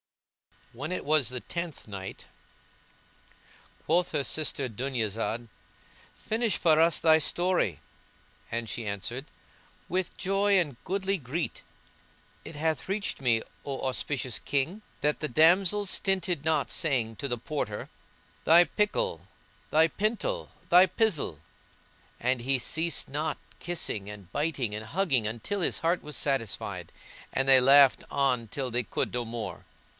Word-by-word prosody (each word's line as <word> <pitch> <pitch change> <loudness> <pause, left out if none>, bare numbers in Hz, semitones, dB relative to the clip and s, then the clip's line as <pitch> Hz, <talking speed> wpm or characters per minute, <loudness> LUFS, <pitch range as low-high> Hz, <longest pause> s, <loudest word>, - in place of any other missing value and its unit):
When 140 +8 -5
it 185 - -3
was 150 -4 +3
the 125 -1 -4
Tenth 170 -7 -6
Night, 95 -2 -7 1.6
Quoth 175 +2 +1
her 145 -2 +1
sister 145 -2 0
Dunyazad, 115 -1 -2 0.7
"Finish 220 -3 0
for 160 -2 +4
us 165 0 +4
thy 160 -1 +6
story;" 175 - +1 0.7
and 115 0 -3
she 115 -3 -4
answered, 105 +7 -4 0.6
"With 185 0 -2
joy 195 +1 +2
and 150 -9 -1
goodly 195 +1 -1
gree." 150 +5 -3 0.9
It 160 - -9
hath 160 +1 -1
reached 200 -6 -1
me, 115 -4 +2 0.2
O 135 -2 -4
auspicious 130 -1 -1
King, 145 +9 -1 0.2
that 150 +1 +1
the 155 - -1
damsels 180 +7 +4
stinted 180 -5 +1
not 155 -3 +1
saying 120 -8 0
to 140 - -3
the 120 -2 -2
Porter 115 -6 -4 0.6
"Thy 170 +2 +8
prickle, 155 - -1 0.4
thy 160 +1 +5
pintle, 235 - -2 0.2
thy 180 +2 +7
pizzle," 170 - 0 0.8
and 125 0 +1
he 135 +2 +1
ceased 160 +6 0
not 150 +2 -2 0.2
kissing 135 - -2
and 100 -4 -11
biting 140 - -1
and 105 +1 -5
hugging 135 - +1
until 120 - -3
his - - +1
heart 170 +2 +1
was 150 0 -6
satisfied, 135 -8 -2 0.4
and 135 - +1
they 135 -1 +8
laughed 135 +1 +6
on 125 -4 +1
till 130 +3 -4
they 120 +1 0
could - - -2
no 120 -1 -1
more. 115 0 -6
145 Hz, 135 wpm, -28 LUFS, 120-175 Hz, 1.6 s, Thy